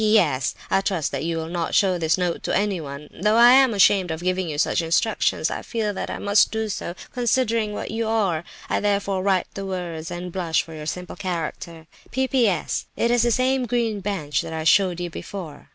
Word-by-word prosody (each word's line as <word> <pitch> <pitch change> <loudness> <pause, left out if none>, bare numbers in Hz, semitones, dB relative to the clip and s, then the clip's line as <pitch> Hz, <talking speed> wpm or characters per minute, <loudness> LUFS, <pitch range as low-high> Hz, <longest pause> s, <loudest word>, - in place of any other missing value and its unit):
"P.S.—I 190 -4 +2
trust 180 -7 -1
that 140 +2 -3
you 165 0 -1
will 160 - -3
not 170 -1 -2
show 185 -3 +3
this 160 +1 +2
note 180 -2 -1
to - - -1
anyone. 155 -8 -3
Though 210 +2 +3
I 240 +1 +8
am 265 -1 +6
ashamed 195 -3 +4
of 160 +1 -4
giving 185 -1 0
you 150 - -4
such 165 - +2
instructions, 170 +7 +1
I - - -4
feel 220 -3 -2
that - - -4
I - - -4
must 205 0 +3
do 220 -1 -2
so, 175 -3 -4 0.2
considering 230 -3 +1
what 205 - -5
you 225 0 -2
are. 200 -8 +1 0.2
I - - 0
therefore 200 -2 0
write 190 -2 +2
the 195 - -5
words, 175 -4 -5
and 175 0 -6
blush 170 -3 0
for 165 - -12
your 155 -1 -7
simple 180 +2 -5
character. 170 -2 -5 0.2
"P.P.S.—It 240 - 0
is 240 -1 +3
the 240 - +3
same 255 +1 +1
green 230 -3 0
bench 170 -8 -2
that 160 - -7
I 160 0 -3
showed 180 +1 +3
you 175 -1 -4
before. 165 -4 -8
190 Hz, 200 wpm, -23 LUFS, 165-215 Hz, 0.2 s, I